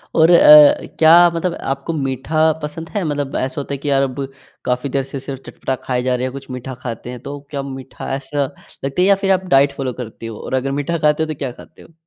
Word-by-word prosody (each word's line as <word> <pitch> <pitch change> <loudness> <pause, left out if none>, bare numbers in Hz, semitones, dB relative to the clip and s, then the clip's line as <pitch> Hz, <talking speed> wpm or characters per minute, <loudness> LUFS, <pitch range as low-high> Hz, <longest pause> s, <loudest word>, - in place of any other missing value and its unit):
और 160 0 +5
अ, 150 -3 +8
क्या 170 +2 +7
मतलब 170 +1 -1 0.2
आपको 140 +4 -6
मीठा 150 +3 +1
पसंद 160 +2 -6
है 205 -3 -2
मतलब 145 -3 -3
ऐसा 130 +3 -2
होता 140 - -6
है - - -2
कि 145 +2 -4
यार 135 -1 +3
अब 135 +1 -3 0.4
काफ़ी 125 +2 -1
देर 135 +1 0
से 135 +1 -7
सिर्फ़ 135 0 -7
चटपटा 130 - -3
खाए 125 -1 -1
जा 125 0 +1
रहें 125 +1 -2
हैं, 130 - -3
कुछ 135 -1 -9
मीठा 125 +1 -6
खाते 120 -1 -6
हैं। 125 0 -7
तो 140 +1 -6
क्या 140 -2 -3
मीठा 135 -1 -8
ऐसा 140 +1 -2
लगता 135 +3 -6
है 185 - +4
या 200 - +6
फिर 195 -1 +2
आप 185 0 +1
डाइट 140 +1 +4
फ़ॉलो 130 -3 -2
करते 115 -1 -9
हो 110 -2 -8
और - - -7
अगर 130 +1 0
मीठा 170 +4 -2
खाते 150 0 +2
हो - - -3
तो - - -12
क्या 135 -3 -3
खाते - - -16
हो? 165 - -18
140 Hz, 250 wpm, -19 LUFS, 130-155 Hz, 0.4 s, अ